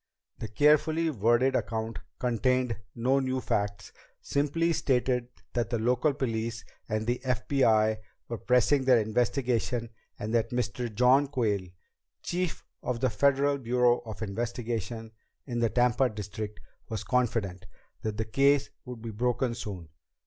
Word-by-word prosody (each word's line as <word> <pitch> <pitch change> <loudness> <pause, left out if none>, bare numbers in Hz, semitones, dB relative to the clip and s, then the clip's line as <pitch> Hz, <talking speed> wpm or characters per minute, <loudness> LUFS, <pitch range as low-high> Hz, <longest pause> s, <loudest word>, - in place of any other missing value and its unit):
The 110 - -4
carefully 150 +7 +3
worded 120 +2 +3
account 115 -1 -2 0.2
contained 125 0 +1 0.2
no 130 +4 +2
new 130 -1 -1
facts, 100 -4 -2 0.3
simply 155 +4 0
stated 125 -5 +1 0.3
that 120 -3 0
the 120 - 0
local 125 +6 +2
police 115 -4 -2 0.2
and 110 0 -1
the 120 +2 -1
FBI 115 -4 +2 0.3
were 115 - -4
pressing 125 +3 +3
their 130 -2 +6
investigation 120 +1 0 0.3
and 110 +2 -4
that 115 -1 +2
Mr. 125 0 -2
John 125 +6 +4
Quayle, 110 -9 0 0.6
chief 180 -1 -2 0.2
of 125 -2 -2
the 130 -1 +1
Federal 140 +1 +2
Bureau 125 0 +3
of 110 -1 -7
Investigation 115 +1 -3 0.3
in 120 -3 -3
the 115 -1 +2
Tampa 125 +2 +3
district, 105 0 -6 0.3
was 110 -4 -3
confident 105 -7 -1 0.3
that 110 -1 -3
the 110 - -1
case 140 +5 +3
would 125 -3 -8
be 115 - -4
broken 120 +2 0
soon. 100 -8 -6
120 Hz, 135 wpm, -29 LUFS, 110-130 Hz, 0.6 s, their